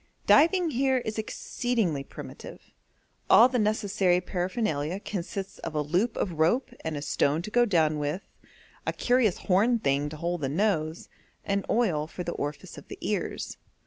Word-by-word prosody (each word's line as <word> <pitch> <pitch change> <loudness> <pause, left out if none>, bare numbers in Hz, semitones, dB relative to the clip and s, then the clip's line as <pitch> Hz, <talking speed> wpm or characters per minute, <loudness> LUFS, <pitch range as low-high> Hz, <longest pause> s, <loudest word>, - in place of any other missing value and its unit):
Diving 335 +2 +5
here 265 +1 +2
is 220 -3 -3
exceedingly 215 - -1
primitive; - - -11 0.6
all 235 - +8
the 250 -1 -1
necessary 205 -4 +2
paraphernalia 180 -3 -2
consists 195 -1 -5
of 160 - -6
a 150 - +1
loop 180 +10 0
of 170 -5 -2
rope 175 +12 +2
and 160 -2 -3
a 145 - -5
stone 150 +2 +1
to 215 - -6
go 240 +1 +4
down 160 -7 +2
with, 150 +6 -2 0.6
a - - +1
curious 245 -6 +2
horn 215 +6 +2
thing 145 -7 0
to 155 - -8
hold 170 +1 -2
the 135 - -1
nose, 160 -1 0 0.4
and 200 0 -1
oil 175 -11 +1
for 180 - -6
the 170 - -3
orifice 145 -2 -5
of - - -17
the - - -8
ears. - - -3
185 Hz, 165 wpm, -27 LUFS, 155-225 Hz, 0.6 s, all